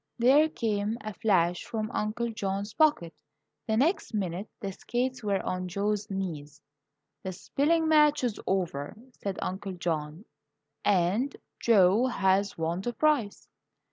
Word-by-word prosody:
There 275 Hz, +6 st, +5 dB
came 215 Hz, -4 st, -1 dB
a 215 Hz, 0 st, -6 dB
flash 180 Hz, -4 st, +1 dB
from 225 Hz, -1 st, -4 dB
Uncle 230 Hz, +2 st, -2 dB
John's 200 Hz, 0 st, -3 dB
pocket; 255 Hz, -, +2 dB, 0.5 s
the 220 Hz, -1 st, +1 dB
next 290 Hz, -, +1 dB
minute 190 Hz, 0 st, -3 dB
the 195 Hz, -, -4 dB
skates 250 Hz, +5 st, -3 dB
were 200 Hz, -2 st, 0 dB
on 185 Hz, 0 st, -2 dB
Joe's 205 Hz, +3 st, -1 dB
knees. 155 Hz, -7 st, -5 dB, 0.6 s
"The 190 Hz, -, -4 dB
spelling 315 Hz, -, +1 dB
match 300 Hz, -2 st, +4 dB
is 235 Hz, -4 st, -1 dB
over," 175 Hz, -5 st, -2 dB, 0.2 s
said 195 Hz, -2 st, -3 dB
Uncle 190 Hz, +1 st, -4 dB
John, 160 Hz, +1 st, -3 dB, 0.6 s
"and 205 Hz, +8 st, +1 dB, 0.2 s
Joe 215 Hz, +2 st, +4 dB
has 195 Hz, -3 st, +1 dB
won 165 Hz, +2 st, -1 dB
the 240 Hz, +4 st, -3 dB
prize." 270 Hz, -5 st, +1 dB
205 Hz, 135 wpm, -28 LUFS, 185-240 Hz, 0.6 s, There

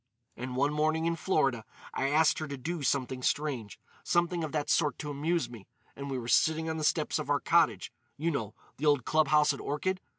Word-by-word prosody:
"And 125 Hz, +1 st, -5 dB
one 140 Hz, +3 st, +1 dB
morning, 155 Hz, +2 st, +1 dB
in 170 Hz, 0 st, +1 dB
Florida, 135 Hz, -, +1 dB, 0.3 s
I 135 Hz, -, 0 dB
asked 155 Hz, +2 st, +3 dB
her 155 Hz, -, -4 dB
to 140 Hz, -1 st, -5 dB
do 165 Hz, +5 st, -4 dB
something 130 Hz, -1 st, -1 dB
strange—something 155 Hz, -, -1 dB
of 155 Hz, -, -3 dB
that 150 Hz, -2 st, -1 dB
sort 150 Hz, -1 st, +2 dB
to 150 Hz, -, -5 dB
amuse 160 Hz, +4 st, 0 dB
me—and 120 Hz, +5 st, -11 dB
we 135 Hz, -, -2 dB
were 120 Hz, -2 st, -5 dB
sitting 160 Hz, +6 st, +3 dB
on 160 Hz, 0 st, -2 dB
the 155 Hz, -, -3 dB
steps 155 Hz, 0 st, +1 dB
of 150 Hz, -, -5 dB
our 145 Hz, -1 st, +3 dB
cottage—you 160 Hz, -3 st, 0 dB
know, 110 Hz, -7 st, -3 dB, 0.2 s
the 150 Hz, -, -1 dB
old 145 Hz, -5 st, +3 dB
club 155 Hz, -1 st, +3 dB
house 150 Hz, -1 st, +4 dB
at 140 Hz, -, -7 dB
Orchid! 185 Hz, +6 st, -2 dB
150 Hz, 200 wpm, -30 LUFS, 135-160 Hz, 0.3 s, house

